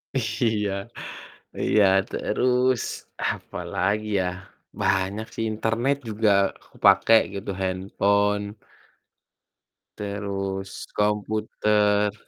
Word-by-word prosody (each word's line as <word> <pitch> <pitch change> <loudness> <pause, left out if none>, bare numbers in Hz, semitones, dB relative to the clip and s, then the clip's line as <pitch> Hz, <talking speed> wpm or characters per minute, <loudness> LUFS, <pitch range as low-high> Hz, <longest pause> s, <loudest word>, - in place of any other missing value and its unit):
Iya, 110 -4 0 0.9
iya 105 - +4 0.3
terus, 125 +2 +1 0.5
apalagi 105 +3 -2
ya, 95 - +1 0.6
banyak 95 +2 +1
sih. - - -3
Internet 115 +5 0
juga 110 0 +1 0.3
aku - - -25
pake 100 +3 +6 0.2
gitu, 100 0 -6
handphone. 100 +2 +1 1.5
Terus 100 -1 -4
komputer. 105 0 +1
105 Hz, 75 wpm, -25 LUFS, 100-110 Hz, 1.5 s, pake